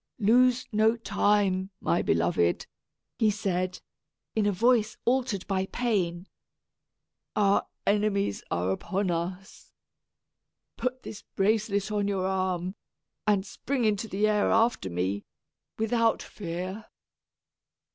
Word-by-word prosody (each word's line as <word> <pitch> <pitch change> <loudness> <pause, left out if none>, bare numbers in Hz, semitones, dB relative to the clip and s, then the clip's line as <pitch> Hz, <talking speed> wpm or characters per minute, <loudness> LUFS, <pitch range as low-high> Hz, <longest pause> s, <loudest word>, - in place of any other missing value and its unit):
"Lose 245 +3 +4
no 220 +2 +3
time, 200 -3 +1
my 170 - +1
beloved!" 85 +1 +1 0.5
he 220 - +4
said, 185 -3 -1 0.6
in 215 -2 +2
a - - +3
voice 230 +2 +2
altered 245 -6 +1
by 190 -1 -1
pain. 195 -8 -1 1.1
"Our 200 -1 +3 0.2
enemies 200 - +1
are 90 +2 0
upon 190 - -1
us. 180 +4 -5 1.0
Put 255 +2 -3
this 210 - -8
bracelet 205 0 0
on 205 -1 0
your 195 -2 0
arm, 185 -1 -1 0.5
and 200 -2 +3
spring 255 +4 -2
into 215 +1 +1
the 205 +1 +1
air 210 -1 +2
after 225 - +2
me, 95 +3 -2 0.5
without 225 +1 +1
fear." 185 +3 -6
200 Hz, 110 wpm, -28 LUFS, 185-220 Hz, 1.1 s, Lose